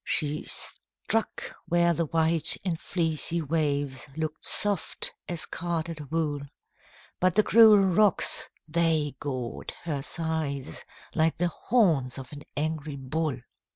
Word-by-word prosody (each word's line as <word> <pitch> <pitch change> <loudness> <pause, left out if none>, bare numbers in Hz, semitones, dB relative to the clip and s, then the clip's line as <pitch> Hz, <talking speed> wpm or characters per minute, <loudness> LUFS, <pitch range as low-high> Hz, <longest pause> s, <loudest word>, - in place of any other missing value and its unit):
She 150 0 +1
struck 225 0 -2
where 170 0 +3
the 165 0 -1
white 165 0 +4
and 170 -4 -1
fleecy 165 -1 -1
waves 145 -4 -1
Look'd 155 -1 -4
soft 205 -4 +1 0.2
as 175 -2 0
carded 165 -3 -4
wool, 155 -2 -1 0.8
But 185 -1 +2
the 215 - +5
cruel 220 -1 +7
rocks, 195 0 +4 0.2
they 160 -3 +1
gored 130 -4 -5
her 150 -5 -3
sides 155 -3 -3 0.3
Like 160 0 +1
the 175 +1 +1
horns 160 - +1
of 135 +1 -9
an 145 - -9 0.2
angry 155 -1 -2
bull. 140 0 -3
160 Hz, 120 wpm, -27 LUFS, 145-170 Hz, 0.8 s, cruel